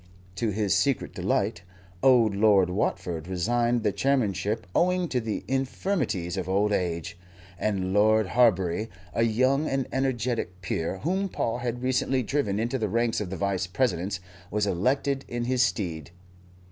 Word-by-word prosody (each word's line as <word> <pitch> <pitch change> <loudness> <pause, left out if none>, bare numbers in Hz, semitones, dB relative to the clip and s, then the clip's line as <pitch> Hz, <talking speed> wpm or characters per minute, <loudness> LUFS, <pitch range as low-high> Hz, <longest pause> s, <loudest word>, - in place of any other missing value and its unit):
To 115 +2 0
his 105 -1 0
secret 130 +6 0
delight, 85 - -1 0.4
old 120 -5 +5
Lord 100 -3 +4
Watford 85 -4 -2
resigned 120 +6 +1
the 105 - +2
chairmanship 110 -5 0
owing 180 0 +2
to 125 - 0
the 110 -2 -3
infirmities 130 - -1
of 95 -1 -3
old 100 +2 +2
age, 85 -3 -2 0.4
and 95 -3 -1
Lord 110 0 +4
Harbury, 105 -3 +2 0.2
a - - 0
young 130 +6 +2
and 135 -2 -1
energetic 120 -7 -1
peer 85 0 -2
whom 190 +5 0
Paul 120 -7 -2
had 120 0 -3
recently 130 0 +1
driven 105 -5 -1
into 120 +4 -1
the 110 -2 -1
ranks 115 +1 +1
of 100 - -4
the 95 - -5
Vice 95 0 -1
Presidents, 100 -2 -1 0.3
was 105 0 0
elected 135 +8 0
in 120 0 -3
his 125 +1 +1
stead. 85 -10 -1
110 Hz, 150 wpm, -27 LUFS, 95-130 Hz, 0.4 s, old